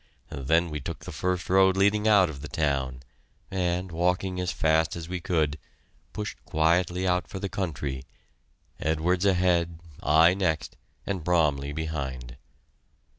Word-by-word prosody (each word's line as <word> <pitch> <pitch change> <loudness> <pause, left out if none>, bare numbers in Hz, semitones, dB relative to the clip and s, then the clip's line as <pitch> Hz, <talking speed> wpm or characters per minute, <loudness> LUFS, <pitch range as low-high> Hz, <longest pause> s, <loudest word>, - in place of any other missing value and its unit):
Then 80 +5 +1
we 75 - -3
took 65 - -7
the - - -6
first 90 -1 -2
road 95 0 +4
leading 105 +2 +3
out 100 -4 +6
of 70 -4 -8
the 75 - -6
town, 65 -5 -1 0.5
and, 90 -1 -1
walking 90 +2 0
as 90 0 -1
fast 80 0 +1
as 85 -1 -6
we 90 +1 -3
could, 80 -4 0 0.5
pushed 105 0 -6
quietly 90 +3 +1
out 90 0 +1
for 100 - -7
the 95 +1 -3
country, 75 -9 -3 0.8
Edwards 85 +4 0
ahead, 90 -3 +2 0.2
I 80 +4 +5
next, 80 -7 -1 0.3
and 95 -5 -3
Bromley 75 -5 +1
behind. 70 -6 -5
85 Hz, 140 wpm, -27 LUFS, 75-90 Hz, 0.8 s, out